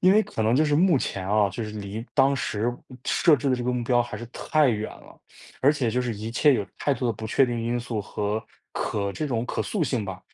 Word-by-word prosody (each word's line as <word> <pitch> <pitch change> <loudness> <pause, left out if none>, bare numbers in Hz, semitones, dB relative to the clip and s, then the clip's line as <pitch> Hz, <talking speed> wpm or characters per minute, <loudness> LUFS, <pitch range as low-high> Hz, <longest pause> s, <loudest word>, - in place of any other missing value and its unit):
因 185 +1 +6
为 215 - +6
可 110 - -3
能 110 +2 +3
就 155 +4 +4
是 150 - +2
目 170 -1 +4
前 95 -6 -3
啊， 105 -1 +3
就 105 +6 -5
是 105 - -6
离 105 +1 -6
当 135 -1 +4
时 120 -3 -1 0.3
设 160 -3 +4
置 140 +1 -1
的 - - +4
这 120 - -4
个 125 - 0
目 125 -1 -1
标 120 0 +3
还 120 - -7
是 120 - -7
太 155 -3 +2
远 110 -2 -1
了。 - - -15 0.4
而 140 +3 +5
且 135 -6 -1
就 125 - 0
是 120 -2 -2
一 110 +2 -5
切 145 +5 +4
有 105 -5 -1
太 145 - +1
多 125 -1 -1
的 115 - +1
不 110 +1 -6
确 135 - +4
定 120 -1 -2
因 120 +1 -1
素 120 -2 -3
和 105 +2 -3 0.3
可 100 -1 -2
这 155 - -3
种 120 -4 -1
可 - - -2
塑 205 - -2
性 125 -5 -1
吧。 95 -2 -6
120 Hz, 285 characters per minute, -25 LUFS, 110-135 Hz, 0.4 s, 因